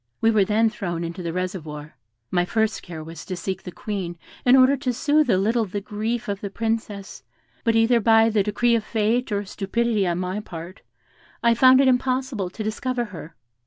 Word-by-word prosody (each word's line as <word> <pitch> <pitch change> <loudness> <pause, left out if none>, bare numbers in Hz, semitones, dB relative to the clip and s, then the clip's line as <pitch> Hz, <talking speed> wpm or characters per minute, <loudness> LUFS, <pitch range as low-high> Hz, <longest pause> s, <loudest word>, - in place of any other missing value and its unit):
We 225 - +3
were 215 -3 +4
then 220 +3 +2
thrown 175 -6 -4
into 170 +2 -5
the 170 -1 -3
reservoir. 160 -5 -5 0.4
My 175 -1 +2
first 220 +3 0
care 160 -3 -8
was 160 0 -9
to 185 - -5
seek 190 +1 -4
the 180 - -8
Queen, 180 -3 -5 0.3
in 250 +1 +7
order 265 +1 +6
to 255 -2 -2
soothe 295 +3 +2
a 190 - +4
little 225 +4 +1
the 205 +1 -4
grief 215 +3 -3
of 200 -1 -3
the 200 - -4
Princess, 220 -2 -3 0.4
but 230 -2 +2
either 225 +1 +4
by 225 0 +5
the 210 -1 +3
decree 225 +4 +1
of 230 -2 +2
fate 230 +3 0
or 205 0 -1
stupidity 210 +1 -1
on 170 -1 0
my 185 +2 -2
part, 175 -2 -9 0.6
I 235 0 +5
found 255 +3 +6
it 275 - +3
impossible 255 -5 0
to 215 - -6
discover 240 +3 -2
her. 165 -2 -9
210 Hz, 200 wpm, -23 LUFS, 185-235 Hz, 0.6 s, in